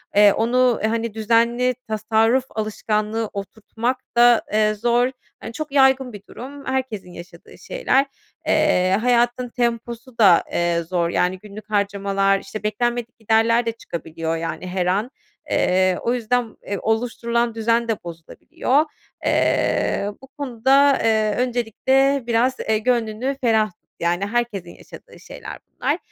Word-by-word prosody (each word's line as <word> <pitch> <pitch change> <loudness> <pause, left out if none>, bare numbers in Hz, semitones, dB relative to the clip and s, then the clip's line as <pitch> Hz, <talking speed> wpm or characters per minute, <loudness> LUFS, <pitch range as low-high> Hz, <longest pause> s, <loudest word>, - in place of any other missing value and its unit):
Eee, 205 -1 +7
onu 245 +1 +2
hani, 225 0 -1
düzenli 235 +3 +2
tasarruf 220 +3 +2
alışkanlığı 215 0 -2
oturtmak 220 +5 -3 0.2
da, 240 -1 +6
eee, 215 0 +3
zor. 240 +4 +1 0.3
Hani, 230 - -8
çok 305 +2 -5
yaygın 265 -2 +3
bir 205 - -9
durum. 275 +3 -9
Herkesin 255 -9 -3
yaşadığı 175 +1 -13
şeyler. 455 - +1 0.4
Eee, 195 -12 +3
hayatın 245 0 +1
temposu 235 0 -3
da, 190 -6 +6
eee, 170 -1 +1
zor. 170 0 -1
Yani, 180 +2 0
günlük 210 +1 -12
harcamalar, 200 -1 +1
işte, 200 +3 -8
beklenmedik 240 +2 -2
giderler 225 +2 +2
de 230 - 0
çıkabiliyor, 165 -6 -5
yani, 165 +2 -5
her 180 0 -1
an. 205 +8 0 0.4
Eee, 185 0 +2
o 235 - 0
yüzden, 245 -1 -1
eee, 200 - -2
oluşturulan 235 +1 -1
düzen 230 +1 +1
de 225 - 0
bozulabiliyor. 175 - -1 0.4
Eee, 200 - +1
bu 270 - -13
konuda, 275 0 +2
eee, 215 -2 +2
öncelikle 255 +3 +1
biraz, 245 +3 +1
eee, 220 0 0
gönlünü 235 +2 -1
ferah 220 -2 +4
tut, 175 - -37 0.2
yani, 175 +3 0
herkesin 215 -5 -2
yaşadığı - - -14
şeyler - - -9
bunlar. - - -2
225 Hz, 135 wpm, -21 LUFS, 205-245 Hz, 0.4 s, Eee